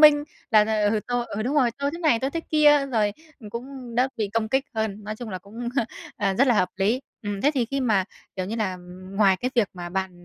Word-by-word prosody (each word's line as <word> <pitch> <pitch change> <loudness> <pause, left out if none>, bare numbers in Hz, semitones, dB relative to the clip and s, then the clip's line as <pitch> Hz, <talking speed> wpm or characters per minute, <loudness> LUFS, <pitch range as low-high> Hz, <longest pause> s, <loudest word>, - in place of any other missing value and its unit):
minh 295 -1 +8 0.3
là, 215 -3 +6 0.3
ừ, 215 - +1
tôi 245 -1 0
ừ, 215 +2 -3
đúng 265 +5 -1
rồi, 250 -4 +4
tôi 280 0 0
thế 335 - -5
này 310 -9 +3
tôi 270 +1 0
thế 330 - -2
kia, 295 -3 +4
rồi 215 -5 +1 0.4
cũng 250 +1 -7
đỡ 255 +2 +3
bị 210 -3 -1
công 220 -1 +1
kích 265 +3 +1
hơn. 215 -2 -2
Nói 215 +1 -4
chung 240 -1 -7
là, 185 - -4
cũng, 225 +5 -7 0.5
à, 195 -2 +1
rất 270 +7 +4
là 245 - +4
hợp 185 -3 +3
lý. 210 +6 +2 0.2
Ừm, 205 -1 -3
thế 290 - +5
thì 250 -3 +2
khi 275 +2 -2
mà, 215 -7 +2 0.3
kiểu, 185 0 -2
như 225 +3 -3
là 190 -4 -1 0.3
ngoài 195 -1 +4
cái 250 +5 -2
việc 230 -4 +3
mà 175 -1 -6
bạn 190 +1 -2
230 Hz, 245 wpm, -25 LUFS, 205-265 Hz, 0.5 s, minh